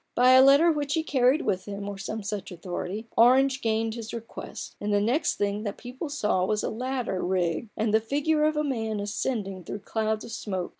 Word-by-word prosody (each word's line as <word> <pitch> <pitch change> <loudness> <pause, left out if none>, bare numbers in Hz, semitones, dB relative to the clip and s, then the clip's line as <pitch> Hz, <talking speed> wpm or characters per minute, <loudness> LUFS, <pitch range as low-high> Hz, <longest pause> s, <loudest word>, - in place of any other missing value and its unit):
By 250 +1 +6
a 260 0 +8
letter 280 +5 +6
which 290 -1 -1
he 320 - 0
carried 270 0 +2
with 190 -3 -1
him, 200 0 -6
or 205 - -4
some 215 +2 -5
such 200 -2 -4
authority, 180 +4 -5
Orange 260 +3 +5
gained 225 0 0
his 230 0 -6
request; 230 0 -8
and 205 0 -1
the 205 - +3
next 240 +10 +1
thing 205 0 -1
that 205 -2 -4
the - - -18
people 255 +5 -6
saw 210 -10 0
was 210 +2 0
a - - -1
ladder 245 -5 -2
rigged, 180 +2 -1
and 215 -1 0
the 220 - +4
figure 295 +6 +1
of 310 0 +1
a 300 - +1
man 225 -6 -2
ascending 200 -2 -3
through 200 +4 -6
clouds 220 +1 -2
of 235 - -9
smoke. 190 -5 -4
220 Hz, 215 wpm, -27 LUFS, 205-260 Hz, -, a